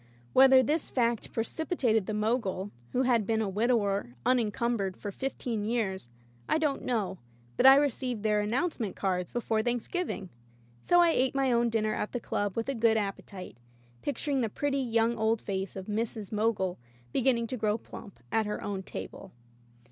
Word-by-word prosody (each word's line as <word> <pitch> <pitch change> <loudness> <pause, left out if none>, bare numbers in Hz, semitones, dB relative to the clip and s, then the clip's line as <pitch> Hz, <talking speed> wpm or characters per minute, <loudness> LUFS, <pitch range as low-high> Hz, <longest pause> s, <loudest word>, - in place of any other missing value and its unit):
Whether 265 0 +7
this 300 +5 0
fact 235 -3 0
pre 225 - 0
cipitated 240 - 0
the 215 - -2
Mogul 210 -3 -1
— 120 - -29
^who 255 +1 +3
had 235 -5 +2
been 225 -1 +1
a 220 - 0
wid 210 +5 0
ower 200 - 0
unencumbered 230 -4 +1
for 205 - -5
fifteen 240 -2 -3
years 205 - -2 0.2
— 120 0 -26
I - - +3
don't 300 -3 0
know, 215 -7 -2 0.4
but 260 - +5
I 270 - +10
received 260 -5 0
their 210 -1 +2
"announce 260 +12 -1
ment" 210 -5 -3
cards 180 -2 -1
before 225 -2 0
Thanksgiving. 240 - -2 0.5
So 350 0 +5
I 340 -1 +5
ate 260 -2 +1
my 270 -1 +2
own 235 0 +3
dinner 215 -1 0
at 210 - -3
the 245 - -1
club 205 -3 -2
with 230 - -1
a 275 - 0
good 225 -2 +3
ap 200 -2 -1
petite, 185 - -10 0.4
picturing 285 -1 -1
the 225 - 0
pretty 280 +5 -1
young 230 -2 +1
old 220 +1 +2
face 195 -2 -4
of 190 -1 -6
Mrs. 215 -1 -3
Mogul 210 - 0 0.3
beginning 240 -2 +2
to 240 - -4
grow 215 -1 +1
plump 200 - -11
at 220 -1 +1
her 210 - -3
own 200 -2 -3
table. - - -8
225 Hz, 185 wpm, -29 LUFS, 205-250 Hz, 0.5 s, I